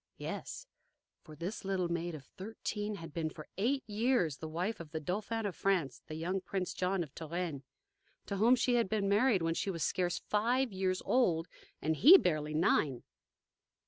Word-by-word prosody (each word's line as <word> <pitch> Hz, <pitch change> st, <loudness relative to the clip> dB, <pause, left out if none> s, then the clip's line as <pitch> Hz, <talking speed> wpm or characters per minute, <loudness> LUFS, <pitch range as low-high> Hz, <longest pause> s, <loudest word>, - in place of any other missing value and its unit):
Yes. -, -, -6 dB, 0.6 s
For 155 Hz, -, -13 dB
this 180 Hz, +9 st, -5 dB
little 190 Hz, -2 st, 0 dB
maid 170 Hz, 0 st, -2 dB
of 140 Hz, -3 st, -10 dB
thirteen 210 Hz, -, -5 dB
had 165 Hz, -5 st, -9 dB
been 160 Hz, -2 st, -1 dB
for 155 Hz, -1 st, -11 dB
eight 265 Hz, +6 st, +1 dB
years 210 Hz, -, +1 dB
the 160 Hz, -, -6 dB
wife 180 Hz, +8 st, -2 dB
of 165 Hz, -3 st, -8 dB
the 160 Hz, +1 st, -4 dB
Dauphin 210 Hz, +7 st, -2 dB
of 200 Hz, -, -2 dB
France, 170 Hz, -10 st, 0 dB
the 155 Hz, -, -6 dB
young 180 Hz, +4 st, -2 dB
Prince 185 Hz, -1 st, -3 dB
John 185 Hz, 0 st, 0 dB
of 145 Hz, -4 st, -12 dB
Touraine, 165 Hz, -2 st, -4 dB, 0.6 s
to 200 Hz, -, -3 dB
whom 230 Hz, +5 st, +6 dB
she 250 Hz, 0 st, +1 dB
had 235 Hz, -5 st, +2 dB
been 210 Hz, -2 st, 0 dB
married 205 Hz, -2 st, +3 dB
when 165 Hz, 0 st, +1 dB
she 195 Hz, -, -2 dB
was 165 Hz, -4 st, -2 dB
scarce 180 Hz, -2 st, 0 dB
five 240 Hz, +3 st, 0 dB
years 185 Hz, -1 st, -1 dB
old 175 Hz, -10 st, +2 dB, 0.4 s
and 160 Hz, +1 st, +1 dB
he 315 Hz, -, +10 dB
barely 155 Hz, -, 0 dB
nine. 145 Hz, -5 st, +2 dB
185 Hz, 180 wpm, -33 LUFS, 165-215 Hz, 0.6 s, he